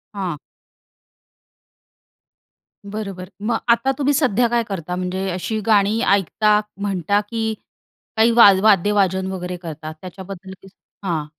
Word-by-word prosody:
हां. 180 Hz, -6 st, -3 dB, 2.5 s
बरोबर. 200 Hz, -3 st, -6 dB
मग 225 Hz, +2 st, 0 dB
आता 235 Hz, +3 st, +3 dB
तुम्ही 285 Hz, 0 st, +1 dB
सध्या 250 Hz, -5 st, +2 dB
काय 235 Hz, 0 st, +1 dB
करता? 180 Hz, -3 st, -4 dB
म्हणजे 185 Hz, +1 st, -3 dB
अशी 185 Hz, +5 st, -3 dB
गाणी 210 Hz, 0 st, +3 dB
ऐकता, 210 Hz, +2 st, +3 dB, 0.2 s
म्हणता, 200 Hz, 0 st, 0 dB
की 220 Hz, +1 st, -3 dB, 0.6 s
काही 225 Hz, +2 st, +5 dB
वा 230 Hz, -3 st, +8 dB
वाद्य 205 Hz, -2 st, +4 dB
वाजन 190 Hz, -2 st, +1 dB
वगैरे 180 Hz, -1 st, -5 dB
करतात? 155 Hz, -2 st, -8 dB
त्याच्याबद्दल 190 Hz, 0 st, -9 dB
काही 195 Hz, -, -15 dB, 0.3 s
हां. 165 Hz, -5 st, -2 dB
195 Hz, 120 wpm, -20 LUFS, 185-220 Hz, 2.5 s, वा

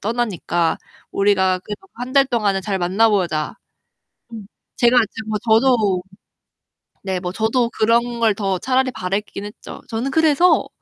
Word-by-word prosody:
떠나니까 200 Hz, -7 st, -1 dB, 0.4 s
우리가 190 Hz, -2 st, +2 dB
그래도 210 Hz, -, -8 dB
1 245 Hz, +2 st, -7 dB
달 275 Hz, 0 st, +5 dB
동안은 205 Hz, -6 st, 0 dB
잘 195 Hz, -1 st, -2 dB
만나보자.' 180 Hz, -4 st, +1 dB, 0.8 s
음. 215 Hz, -3 st, -8 dB, 0.3 s
제가 240 Hz, +1 st, +3 dB, 0.3 s
뭐 215 Hz, -, 0 dB
저도 220 Hz, -5 st, +3 dB, 1.0 s
네. 190 Hz, -1 st, -2 dB
뭐 180 Hz, -1 st, -4 dB
저도 225 Hz, +4 st, 0 dB
그런 235 Hz, +1 st, +1 dB
걸 225 Hz, -2 st, +3 dB
더 195 Hz, -3 st, -1 dB
차라리 260 Hz, +2 st, +1 dB
바랐긴 200 Hz, 0 st, -4 dB
했죠. 210 Hz, -, -10 dB
저는 235 Hz, +4 st, -3 dB
그래서 320 Hz, +3 st, +3 dB
215 Hz, 255 characters per minute, -20 LUFS, 190-240 Hz, 1.0 s, 달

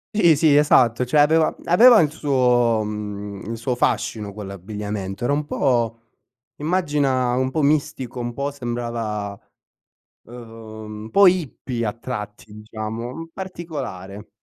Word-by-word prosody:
Sì, 170 Hz, -8 st, +5 dB
sì, 150 Hz, -2 st, +4 dB
esatto, 125 Hz, -5 st, +4 dB
cioè 150 Hz, +5 st, 0 dB
aveva 155 Hz, +2 st, +4 dB
aveva 230 Hz, +7 st, +7 dB
il 155 Hz, -, +3 dB
suo 125 Hz, -6 st, +2 dB
mhmm, 105 Hz, -1 st, -6 dB
il 115 Hz, -, -4 dB
suo 125 Hz, +2 st, -2 dB
fascino 105 Hz, -3 st, -1 dB
quell'abbigliamento, 100 Hz, +1 st, -6 dB
era 140 Hz, -, +1 dB
un 150 Hz, +1 st, -1 dB
po' 120 Hz, -5 st, 0 dB, 0.6 s
immagina 145 Hz, -7 st, 0 dB
un 130 Hz, +1 st, 0 dB
po' 155 Hz, -, 0 dB
mistico, 140 Hz, -4 st, 0 dB
un 120 Hz, 0 st, -3 dB
po' 140 Hz, +3 st, -2 dB
sembrava, 115 Hz, -6 st, -4 dB, 0.8 s
uhm, 110 Hz, -2 st, -10 dB
un 110 Hz, -, -9 dB
po' 200 Hz, -, +6 dB
hippie 135 Hz, -9 st, -1 dB
a 105 Hz, -, 0 dB
tratti, 105 Hz, -2 st, -7 dB
diciamo, 110 Hz, +2 st, -6 dB
mhmm, 165 Hz, -, -7 dB
particolare. 145 Hz, -, -7 dB
120 Hz, 135 wpm, -22 LUFS, 105-145 Hz, 0.8 s, aveva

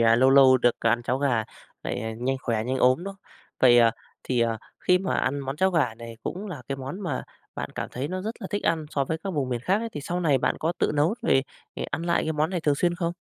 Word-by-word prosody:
là 115 Hz, 0 st, +5 dB
lâu 130 Hz, +2 st, +5 dB
lâu 135 Hz, -1 st, +7 dB
được 120 Hz, -1 st, +3 dB
ăn 120 Hz, +1 st, +2 dB
cháo 125 Hz, +2 st, -1 dB
gà, 125 Hz, -6 st, +1 dB, 0.4 s
lại, -, -, -3 dB
à, 110 Hz, -, -3 dB
nhanh 130 Hz, +2 st, 0 dB
khỏe, 110 Hz, -3 st, -1 dB
nhanh 130 Hz, +2 st, -1 dB
ốm, 130 Hz, +7 st, +3 dB
đúng 195 Hz, 0 st, -5 dB
không? 195 Hz, -, -29 dB, 0.4 s
Vậy, 120 Hz, -2 st, +7 dB
à, 115 Hz, -1 st, +6 dB, 0.3 s
thì, 125 Hz, -2 st, 0 dB
ờ, 115 Hz, -1 st, +1 dB, 0.2 s
khi 180 Hz, -, +4 dB
mà 190 Hz, +1 st, -2 dB
ăn 140 Hz, -, 0 dB
món 135 Hz, 0 st, -4 dB
cháo 190 Hz, +4 st, +3 dB
gà 145 Hz, -11 st, +1 dB
này 115 Hz, 0 st, -9 dB
cũng 195 Hz, +4 st, -5 dB
là 150 Hz, -10 st, -7 dB
cái 135 Hz, -, -2 dB
món 135 Hz, +8 st, -6 dB
mà 185 Hz, -, -3 dB, 0.3 s
bạn -, -, -5 dB
cảm -, -, -4 dB
thấy 130 Hz, +4 st, -3 dB
nó 185 Hz, +1 st, -3 dB
rất 220 Hz, +3 st, -3 dB
là 195 Hz, -, -5 dB
thích 205 Hz, -, -2 dB
ăn 160 Hz, -2 st, +1 dB
so 140 Hz, -3 st, 0 dB
với 160 Hz, +4 st, -3 dB
các 195 Hz, -, -1 dB
vùng 140 Hz, -4 st, -1 dB
miền 120 Hz, -2 st, -2 dB
khác 190 Hz, -, +1 dB
ấy, 230 Hz, -, -3 dB
thì 150 Hz, -, -5 dB
sau 175 Hz, +5 st, -3 dB
này 150 Hz, -6 st, +3 dB
bạn -, -, 0 dB
có 165 Hz, +2 st, 0 dB
tự -, -, +2 dB
nấu 150 Hz, +7 st, +2 dB
về 135 Hz, -, +3 dB, 0.3 s
để -, -, -3 dB
ăn 165 Hz, -, -2 dB
lại 170 Hz, 0 st, +1 dB
cái 160 Hz, -, -1 dB
món 155 Hz, +2 st, 0 dB
này 180 Hz, -2 st, -2 dB
thường 150 Hz, -2 st, +2 dB
xuyên 175 Hz, +4 st, +1 dB
không? 170 Hz, -1 st, -2 dB
140 Hz, 285 wpm, -26 LUFS, 125-175 Hz, 0.4 s, lâu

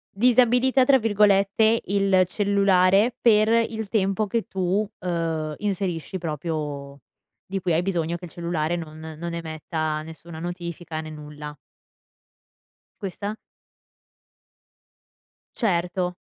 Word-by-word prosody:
"disabilita", 250 Hz, +3 st, +4 dB
tra 265 Hz, -1 st, +5 dB
virgolette, 210 Hz, +1 st, +3 dB
il 195 Hz, -1 st, +3 dB
cellulare 200 Hz, +2 st, +3 dB
per 215 Hz, -2 st, +5 dB
il 225 Hz, -2 st, +1 dB
tempo 195 Hz, 0 st, +1 dB
che 225 Hz, +2 st, 0 dB
tu, 190 Hz, +2 st, 0 dB
uhm, 165 Hz, -3 st, -2 dB
inserisci, 190 Hz, -3 st, -2 dB
proprio 150 Hz, -3 st, -4 dB, 0.5 s
di 195 Hz, +1 st, -2 dB
cui 175 Hz, -2 st, 0 dB
hai 165 Hz, -, +3 dB
bisogno 170 Hz, -3 st, -1 dB
che 180 Hz, -, -9 dB
il 170 Hz, -, -12 dB
cellulare 170 Hz, -1 st, -1 dB
non 155 Hz, -2 st, -7 dB, 0.2 s
non 170 Hz, +1 st, -5 dB
emetta 155 Hz, -1 st, -3 dB
nessuna 160 Hz, +1 st, -10 dB
notifica, 170 Hz, -2 st, -5 dB
né 155 Hz, -, -8 dB
nulla. 150 Hz, -1 st, -9 dB, 1.4 s
Questa 200 Hz, +2 st, -4 dB, 2.2 s
Certo. 180 Hz, -3 st, 0 dB
180 Hz, 105 wpm, -24 LUFS, 160-205 Hz, 2.2 s, tra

